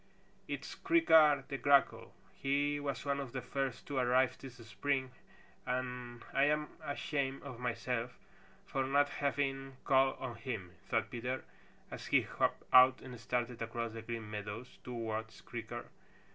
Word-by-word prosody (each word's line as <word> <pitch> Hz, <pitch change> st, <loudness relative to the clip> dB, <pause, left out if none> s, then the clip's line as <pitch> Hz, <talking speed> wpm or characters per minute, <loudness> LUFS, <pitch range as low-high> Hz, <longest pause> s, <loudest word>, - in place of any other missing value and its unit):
"It's -, -, -4 dB
Creaker 160 Hz, -, +5 dB
the 140 Hz, -, -4 dB
Grackle. 140 Hz, -1 st, +3 dB, 0.2 s
He 145 Hz, +2 st, +1 dB
was 140 Hz, -1 st, -3 dB
one 140 Hz, 0 st, 0 dB
of 135 Hz, -4 st, -5 dB
the 130 Hz, -, -2 dB
first 130 Hz, -3 st, -2 dB
to 140 Hz, -, -4 dB
arrive 125 Hz, +1 st, +3 dB
this 135 Hz, -3 st, -9 dB
spring 130 Hz, +3 st, -1 dB, 0.5 s
and 125 Hz, -1 st, -3 dB
I'm 150 Hz, +2 st, +3 dB
ashamed 140 Hz, -2 st, -2 dB
of 130 Hz, -4 st, -8 dB
myself 125 Hz, 0 st, -2 dB, 0.5 s
for 135 Hz, -, -1 dB
not 145 Hz, +2 st, +3 dB
having 135 Hz, -2 st, -1 dB
called 135 Hz, -1 st, +4 dB
on 120 Hz, -3 st, -5 dB
him," 110 Hz, -7 st, -5 dB, 0.2 s
thought -, -, +1 dB
Peter, 125 Hz, +2 st, -3 dB, 0.5 s
as -, -, -7 dB
he -, -, +5 dB
hopped -, -, 0 dB
out 130 Hz, 0 st, +8 dB
and 125 Hz, -3 st, -8 dB
started 120 Hz, 0 st, -2 dB
across 115 Hz, 0 st, -3 dB
the 115 Hz, -, -6 dB
Green 115 Hz, -1 st, -5 dB
Meadows 105 Hz, +3 st, -6 dB
towards 110 Hz, -2 st, -4 dB
Creaker. 120 Hz, 0 st, -6 dB
130 Hz, 145 wpm, -34 LUFS, 120-140 Hz, 0.5 s, out